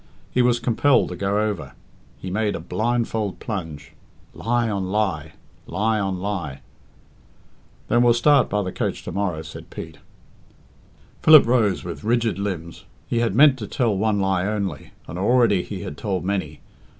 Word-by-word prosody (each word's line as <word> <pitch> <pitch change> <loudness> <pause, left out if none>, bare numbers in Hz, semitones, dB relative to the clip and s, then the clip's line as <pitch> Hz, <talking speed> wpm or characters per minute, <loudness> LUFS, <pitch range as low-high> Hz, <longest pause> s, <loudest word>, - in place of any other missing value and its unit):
He 125 - +2
was 120 -1 +3
compelled 125 +4 +2
to 90 - -5
go 100 +3 0
over. 105 -6 -2 0.4
He 95 - -7
made 105 +1 0
a - - -4
blindfold 110 +2 -2
plunge. 80 - -6 0.4
Lie 120 +1 0
on 100 -3 -2
lie; 95 -8 -1 0.3
lie 110 +5 0
on 95 -2 -1
lie! 90 -9 -4 1.3
"Then 120 - +3
we'll 120 -1 +5
start 140 0 +4
by 105 -1 0
the 90 - -4
coach - - -3
to - - -6
morrow," 90 -6 -2
said - - -10
Pete. - - -9 1.2
Philip 155 -2 +8
rose 115 -5 +2
with 85 +2 -7
rigid 115 -2 +1
limbs. 90 -4 -5 0.2
He 120 - 0
had 115 -4 0
meant 140 0 +6
to 105 - -5
tell 115 -4 0
one 105 +1 +1
lie 95 -1 +1
only, 100 -8 -3 0.2
and 85 - -6
already 115 -2 +3
he 95 0 -7
had 75 - -7
told 95 -4 -2
many. 85 -7 -3
105 Hz, 160 wpm, -23 LUFS, 95-115 Hz, 1.3 s, Philip